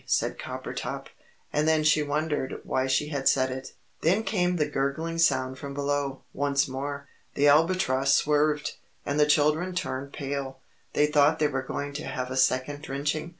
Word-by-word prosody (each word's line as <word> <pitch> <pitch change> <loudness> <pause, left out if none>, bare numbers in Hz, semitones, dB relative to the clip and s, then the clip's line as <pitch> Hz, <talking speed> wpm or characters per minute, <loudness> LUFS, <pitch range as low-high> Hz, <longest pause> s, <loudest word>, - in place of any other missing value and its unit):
said - - 0
Coppertop. - - -5 0.5
And 150 +1 +1
then 160 -1 +3
she 155 0 +4
wondered 150 -1 -2
why 130 0 0
she 135 +3 +1
had 140 -3 +2
said 130 -1 +2
it. 130 +1 -7 0.3
Then 190 +7 +2
came 180 -4 +1
the 155 -3 +1
gurgling 145 +4 -2
sound 130 -4 +2
from 140 0 -7
below, 140 -1 -2
once 140 0 +1
more. 140 +2 -5 0.3
The 145 +1 +3
Albatross 145 -3 +3
swerved, 150 0 +1 0.3
and 145 +1 -1
the 150 - +5
children 155 +5 +2
turned 140 -6 -3
pale 140 -2 -4 0.4
they 150 - +4
thought 150 +1 +4
they 150 - +2
were 135 -2 -2
going 145 +2 -4
to 150 - -5
have 130 -1 -4
a - - -3
second 130 +2 +1
drenching. 150 +3 -2
145 Hz, 170 wpm, -27 LUFS, 135-155 Hz, 0.5 s, the